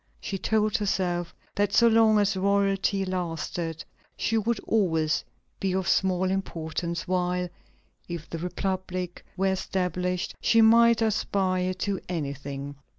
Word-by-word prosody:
She 195 - -4
told 215 0 +1
herself 180 -4 -1 0.2
that 205 0 0
so 235 +4 +6
long 220 -1 +5
as 205 -1 +2
royalty 195 0 +1
lasted, 170 -2 -3 0.3
she 225 - 0
would 225 +1 +1
always 160 -8 +1 0.4
be 190 -1 0
of 190 -1 -1
small 185 -1 +2
importance; 170 -2 -3
while, 180 0 0 0.6
if 170 -2 -6
the 165 - -5
republic 185 0 -3
were 190 +1 +2
established, 180 -1 -2
she 230 - +4
might 230 +1 +6
aspire 185 -4 0
to 195 +1 -2
anything. 140 -3 -4
185 Hz, 125 wpm, -27 LUFS, 175-200 Hz, 0.6 s, so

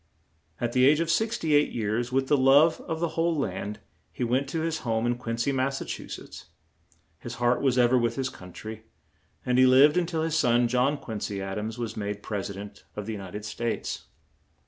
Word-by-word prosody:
At 120 -1 -1
the 130 0 +5
age 150 +2 +5
of 165 0 +1
six 220 +6 +1
ty 160 - -3
eight 150 0 +4
years, 115 +2 -1
with 135 +1 +1
the 145 - +4
love 140 +4 +5
of 160 0 -2
the 170 0 0
whole 165 0 0
land, 105 -4 -3 0.3
he - - -4
went 130 +3 0
to 160 +2 -2
his 160 -1 -1
home 115 -2 -1
in 120 0 +1
Quin 115 -1 -4
cy, 120 +4 +1
Mass. 135 +1 0 1.4
His - - -7
heart 120 0 +1
was 130 -3 +2
ever 125 +1 +5
with 120 -1 0
his 135 -1 -1
coun 90 -5 -12
try; 110 +4 -8 0.6
and 125 0 +2
he 130 - +7
lived 140 +6 +6
un 175 - -1
til 160 -2 -1
his 160 -1 -1
son, 120 -5 +3
John 125 +4 +2
Quin 110 -6 -6
cy 100 - -3
Ad 95 +1 -4
ams, 110 +2 -4
was 120 -2 -4
made 105 -1 -4
Pres 100 -2 -3
i - - -5
dent 100 +1 -9
of 105 - -5
the 110 - -4
U 105 - -5
nit 95 0 -9
ed 105 0 -5
States. 115 +2 -3
125 Hz, 225 wpm, -27 LUFS, 110-145 Hz, 1.4 s, he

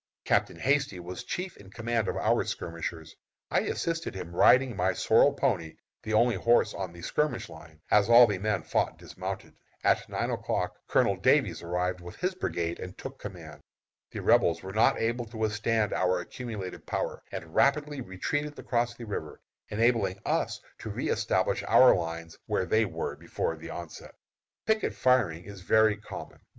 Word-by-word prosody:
Captain - - +1
Hasty 135 -7 +1
was 90 +7 -7
chief 180 +8 -4
in 95 - -14
command 115 0 -1
of - - -2
our - - +2
skirmishers. 85 -1 -5 0.4
I - - +4
assisted 165 -8 -2
him, 90 -2 -7
riding 125 +4 +5
my 95 0 +1
sorrel 115 +9 +4
pony, 105 - -1 0.3
the 110 - -4
only 120 +2 +4
horse 115 +1 +3
on 95 -3 -4
the 85 0 -12
skirmish 150 - -1
line, 80 0 -13
as 105 +1 +5
all 120 +1 +9
the 100 -4 -2
men 105 +1 -1
fought - - 0
dismounted. - - -7 0.3
At - - +2
nine - - -1
o'clock - - -2
Colonel - - +2
Davies - - +2
arrived 90 +1 -2
with 90 0 -9
his 185 +1 -1
brigade 85 - -3
and 90 +1 -8
took 135 0 -8
command. 85 -7 -9 0.5
The - - -6
Rebels - - +3
were 95 0 -7
not 110 - +3
able 120 +1 -1
to 110 0 -11
withstand 110 0 0
our 90 0 +1
accumulated 105 -1 -7
power, - - -2
and 80 - -7
rapidly 145 +1 +2
retreated 145 +10 -3
across 120 -1 -1
the 120 - -8
river, 100 -7 -5 0.3
enabling 115 -3 +2
us - - 0 0.2
to - - -6
reëstablish - - 0
our 130 - +8
lines 85 -1 -5
where 95 - 0
they 110 +3 +3
were - - -4
before 80 - -3
the 80 +1 -10
onset. 85 -2 -8 0.5
Picket 220 0 +1
firing 110 -11 +2
is 100 0 -10
very 110 +3 +4
common. 105 - -9
105 Hz, 165 wpm, -28 LUFS, 90-120 Hz, 0.5 s, all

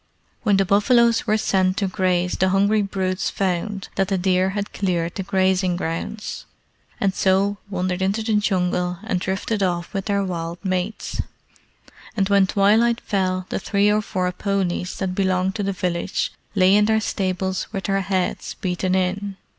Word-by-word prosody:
When 205 -3 +3
the 195 - +3
buffaloes 230 +4 +3
were 215 0 +3
sent 185 -3 +1
to 200 -3 +1
graze 180 -2 0
the 190 - +2
hungry 200 +3 +3
brutes 190 -2 -1
found 195 +1 -2
that 195 - +2
the 195 -1 0
deer 185 0 +2
had 205 0 -3
cleared 175 -3 -1
the - - -4
grazing 190 -1 +1
grounds, 175 +5 -4 0.5
and 195 -2 +1
so 195 +1 +2
wandered 185 -1 -2
into 200 +4 0
the 220 0 0
Jungle 180 -3 +1
and 220 -5 -1
drifted 190 +3 -2
off 175 -1 -1
with 195 -2 -2
their 200 -1 +1
wild 170 -2 -4
mates; 185 +3 -2 1.0
and 195 -1 +1
when 200 -1 +4
twilight 220 +5 +3
fell 185 -2 -1
the - - -2
three 205 +1 +2
or 210 +1 +2
four 185 -3 -1
ponies 185 -2 -2
that 190 -2 -2
belonged 185 0 +1
to 210 - -3
the 200 0 0
village 180 0 -2 0.2
lay 185 -1 +5
in 210 0 +5
their 220 0 +3
stables 190 -2 -2
with 195 - -4
their 195 0 0
heads 185 -1 -2
beaten 185 -1 -1
in. 190 +1 -1
190 Hz, 170 wpm, -22 LUFS, 185-200 Hz, 1.0 s, lay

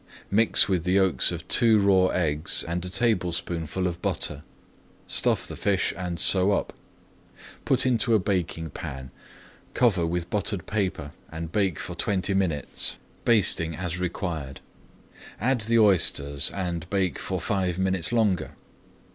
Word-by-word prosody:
Mix 110 -2 +4
with 90 -4 0
the 90 +1 0
yolks 95 -7 +3
of 85 0 -7
two 115 -2 +4
raw 95 -2 +4
eggs 80 -4 0
and 85 +1 -3
a 90 - -5
tablespoonful 90 - -1
of 90 -1 -3
butter. 75 -1 -2 0.6
Stuff - - +1
the - - -7
fish 100 -2 0
and 90 -3 -5
sew 95 +5 +5
up. - - -2 0.9
Put - - +2
into 120 -2 +2
a - - +4
baking 90 -5 -2
pan, 65 -1 -8 0.6
cover 95 -9 +2
with 85 +1 -3
buttered 100 -3 -2
paper, 95 -8 -3 0.2
and 80 0 -6
bake 95 -5 0
for - - -6
twenty 100 -1 -1
minutes, 90 -7 -1 0.3
basting 95 -7 +2
as 90 +1 -4
required. 85 -6 -4 0.8
Add 125 +2 0
the 115 +1 +1
oysters 75 -9 +3
and 85 -3 -4
bake 95 -3 -1
for 95 -1 -3
five 90 -1 -1
minutes 95 -1 0
longer. 105 -9 0
90 Hz, 140 wpm, -25 LUFS, 85-100 Hz, 0.9 s, sew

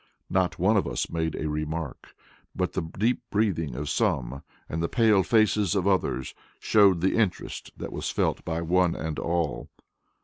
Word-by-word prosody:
Not 90 -3 +1
one 100 +5 +3
of 95 - +1
us - - -2
made 80 -1 -1
a 75 - -3
remark, 75 0 -4 0.4
but 90 -1 -1
the 95 - -1
deep 105 +10 -1
breathing 85 - 0
of 75 +3 -4
some 70 - 0 0.3
and 80 - -3
the 85 - -1
pale 110 -5 +4
faces 105 -3 +2
of 95 -1 +1
others 95 -9 0 0.2
showed 100 -5 +4
the 95 - +2
interest 105 -6 -1
that - - -6
was - - -3
felt - - 0
by 80 0 -2
one 90 +1 +2
and 80 -1 -4
all. 85 -2 -2
85 Hz, 170 wpm, -26 LUFS, 80-100 Hz, 0.4 s, pale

